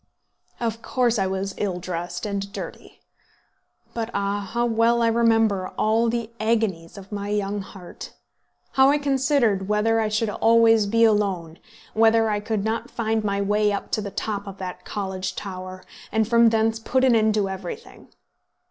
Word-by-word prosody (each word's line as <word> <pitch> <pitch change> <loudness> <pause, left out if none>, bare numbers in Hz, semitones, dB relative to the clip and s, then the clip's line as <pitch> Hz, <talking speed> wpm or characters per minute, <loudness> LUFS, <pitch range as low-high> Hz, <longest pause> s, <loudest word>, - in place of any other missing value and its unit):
Of 230 -1 -2
course 240 -3 +1
I 190 - +1
was 190 +1 -3
ill 190 -4 -1
dressed 175 +3 -5
and 200 -1 -3
dirty. - - -9 0.9
But, 230 -1 -3
ah! 200 0 -2
how 240 0 +1
well 235 0 +2
I - - +3
remember 225 -4 +2
all 225 +2 +2
the 230 -1 -3
agonies 220 -7 -1
of 195 0 -11
my 205 0 -4
young 205 0 -1
heart; 190 -2 -10 0.6
how 265 0 +5
I 290 - +4
considered 270 -8 +1
whether 220 +2 +2
I 220 - +1
should 215 0 0
always 225 -1 +4
be 230 +3 +3
alone; 195 -7 +1 0.3
whether 225 0 +4
I 205 - 0
could 210 -1 -2
not 225 +2 -2
find 225 -2 -1
my 200 -1 -1
way 210 +1 +2
up 200 - -4
to 215 - 0
the 205 - -5
top 205 0 -4
of 195 0 -8
that 180 -1 -7
college 190 -2 -4
tower, 185 -1 -7 0.3
and 220 0 +1
from 235 0 +5
thence 225 0 +1
put 260 +3 0
an 255 -3 +5
end 220 -1 +3
to 205 -2 +1
everything? 190 -2 -8
215 Hz, 170 wpm, -23 LUFS, 195-230 Hz, 0.9 s, how